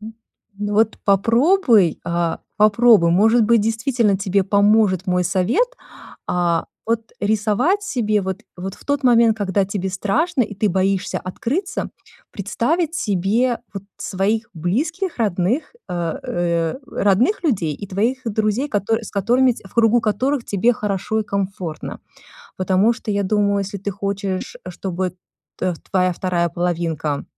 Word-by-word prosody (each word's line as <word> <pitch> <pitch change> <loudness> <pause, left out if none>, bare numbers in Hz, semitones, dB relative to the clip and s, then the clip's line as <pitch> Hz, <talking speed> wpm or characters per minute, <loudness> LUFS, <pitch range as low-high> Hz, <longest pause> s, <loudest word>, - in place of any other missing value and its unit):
Ну, 210 -2 -8
вот 220 0 +2
попробуй, 230 - +3
а? 170 -1 -1 0.2
Попробуй. 210 -4 +5
Может 220 +6 +4
быть, 230 +1 +4
действительно 225 -1 +1
тебе 195 0 0
поможет 200 -1 +3
мой 180 0 +1
совет. 190 - +2 0.6
А, 175 -2 +1 0.2
вот 225 0 -1
рисовать 220 - +1
себе, 215 - 0
вот, 190 +3 -4
вот 190 +2 -5
в - - -18
тот 285 0 0
момент, 235 -3 +4
когда 200 -1 0
тебе 190 -1 -3
страшно 250 - 0
и 210 - -5
ты 205 +1 0
боишься 190 +1 0
открыться, 295 - -3 0.4
представить 265 - -1
себе 225 - 0
вот 195 - -5
своих 210 +4 -1
близких, 300 - -2
родных, 210 - 0
э, 170 -2 -2
э, 170 -2 -1
родных 225 - +1
людей 180 - 0
и 200 - -8
твоих 225 +8 0
друзей, 220 +5 0
котор 215 +1 0
с 215 - -8
которыми, 245 +6 +3
ть - - -12
в 190 - -18
кругу 235 0 +4
которых 240 +5 0
тебе 205 +5 +2
хорошо 210 0 -2
и 215 - -3
комфортно. 195 -5 -4 0.6
Потому 190 +4 +2
что 225 -2 -6
я 200 0 0
думаю, 200 0 +1
если 200 +1 -5
ты 200 +2 -3
хочешь, 200 -1 -4
чтобы 180 0 -4 0.4
тэ 180 -2 -1 0.2
твоя 185 -1 +2
вторая 175 -1 -1
половинка, 165 -4 -2
205 Hz, 140 wpm, -20 LUFS, 185-230 Hz, 0.6 s, Попробуй